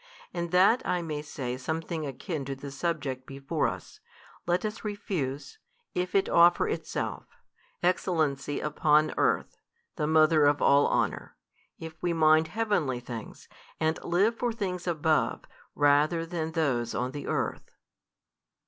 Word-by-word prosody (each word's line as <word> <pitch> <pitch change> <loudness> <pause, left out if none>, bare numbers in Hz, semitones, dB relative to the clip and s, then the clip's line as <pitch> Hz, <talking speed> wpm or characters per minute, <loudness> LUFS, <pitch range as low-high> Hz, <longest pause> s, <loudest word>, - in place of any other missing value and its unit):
And 170 -1 -3
that 190 +8 +4
I 180 -1 -1
may 155 -2 -4
say 130 -4 -5
something 160 +3 -3
akin 145 +3 -4
to 135 0 -4
the 140 +1 -8
subject 140 -4 -3
before 140 +3 -1
us, - - -7 0.5
let 175 +3 +1
us 215 +1 -4
refuse, 195 - -4 0.3
if 180 +1 -2
it 195 - +3
offer 175 - +5
itself, 440 - -4 0.6
excellency 155 -6 0
upon 150 0 +2
earth, - - 0 0.4
the 150 -3 0
mother 155 -1 +5
of 145 0 +3
all 140 +1 +5
honour, - - -1 0.4
if 160 0 -9
we 175 -1 0
mind 155 0 +4
heavenly 175 - 0
things, 120 -3 -9 0.3
and 160 0 0
live 195 +7 +2
for 240 0 -1
things 185 -5 -4
above 160 -2 +1 0.3
rather 150 +3 +3
than 165 -2 -4
those 130 -8 0
on 125 +1 -1
the 145 +1 -7
earth. - - -2
160 Hz, 140 wpm, -28 LUFS, 145-175 Hz, 0.6 s, offer